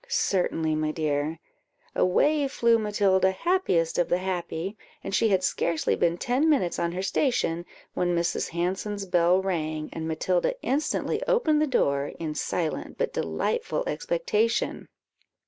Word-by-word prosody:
"Certainly, 175 - 0
my 155 0 0
dear." 155 0 -1 0.6
Away 290 +10 +2
flew 235 -3 +3
Matilda, 200 -3 +2
happiest 190 - +1
of 175 - +1
the 175 - +3
happy; 185 0 -3 0.3
and 195 - -5
she 225 +2 +3
had 190 -2 +2
scarcely 170 -3 0
been 170 0 +1
ten 260 - +1
minutes 255 - +1
on 170 0 -1
her 185 +1 -3
station 185 - 0 0.3
when 175 -1 0
Mrs. 170 0 0
Hanson's 190 +4 -2
bell 180 0 +3
rang, 155 -4 -2
and 160 0 -4
Matilda 180 - 0
instantly 290 +4 0
opened 465 -12 +3
the 305 - +2
door, 140 - +1
in 155 -2 -3
silent 155 +1 -3
but - - -1
delightful 480 +1 -1
expectation. - - -1
185 Hz, 140 wpm, -26 LUFS, 165-265 Hz, 0.6 s, flew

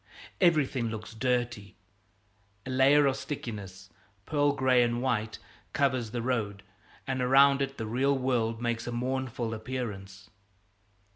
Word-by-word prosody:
Everything 140 -9 +2
looks 110 0 -7
dirty. 120 -4 -2 0.9
A 130 - -5
layer 140 +3 +5
of 135 -1 +2
stickiness, 100 -8 -7 0.3
pearl 145 -1 +2
gray 130 -2 +3
and 120 0 +1
white, 110 -4 -1 0.4
covers 130 -5 +1
the 115 +1 -4
road, 105 -6 -2 0.4
and 130 -1 -2
around 135 +2 +5
it 135 0 -2
the 110 - -4
real 135 +5 +1
world 120 -3 0
makes 120 -1 -2
a - - -2
mournful 125 -1 -2
appearance. 105 -5 -6
125 Hz, 130 wpm, -29 LUFS, 110-130 Hz, 0.9 s, layer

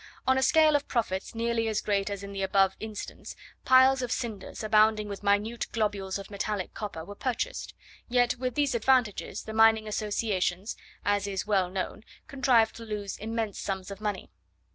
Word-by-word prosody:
On 260 - +4
a 265 - +2
scale 310 +3 +5
of 285 - 0
profits 210 -4 -2
nearly 230 0 0
as 215 -1 0
great 200 -1 0
as 200 -1 -5
in 200 0 -7
the 195 - -4
above 195 0 +3
instance, 215 -1 -7 0.3
piles 260 +1 +6
of 245 -1 -3
cinders, 220 -4 -4
abounding 215 0 +4
with 200 -1 -6
minute 210 +3 +1
globules 205 -4 -1
of 195 +1 -10
metallic 200 -1 -3
copper, 190 -7 -6
were 205 - -8
purchased; 250 +3 -3 0.3
yet 245 0 +2
with 255 -1 -2
these 290 -2 +1
advantages, 235 -2 +1
the 220 - -7
mining 220 0 +5
associations, 205 -2 -1 0.3
as 205 0 +1
is 195 -2 -3
well 195 -4 +2
known, 190 +3 -4 0.2
contrived 255 -6 +3
to 230 - -8
lose 210 -3 -4
immense 220 -1 -3
sums 190 -1 -4
of 200 +1 -8
money. 210 -2 -3
215 Hz, 175 wpm, -28 LUFS, 200-235 Hz, 0.3 s, piles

